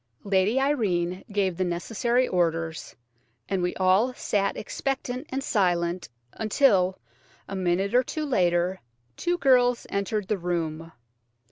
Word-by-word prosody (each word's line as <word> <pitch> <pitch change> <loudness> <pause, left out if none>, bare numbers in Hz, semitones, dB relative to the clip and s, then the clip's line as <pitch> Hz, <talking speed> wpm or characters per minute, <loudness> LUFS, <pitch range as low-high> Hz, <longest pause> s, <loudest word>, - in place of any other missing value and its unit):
Lady 200 +5 +2
Irene 190 -10 0
gave 195 -3 0
the 185 - +1
necessary 225 +8 0
orders, 165 -2 -1 0.5
and 195 -2 -1
we 180 0 -1
all 190 +7 +3
sat 200 -4 -1
expectant 260 +3 -3
and 270 +1 -3
silent 175 -5 0 0.2
until, 205 -5 +2 0.5
a 195 - -5
minute 190 +2 0
or 250 - +6
two 305 +4 -4
later, 180 -7 +1 0.3
two 350 0 -1
girls 250 -5 +3
entered 200 0 -1
the 205 -2 -1
room. 165 -2 -3
195 Hz, 125 wpm, -26 LUFS, 175-245 Hz, 0.5 s, or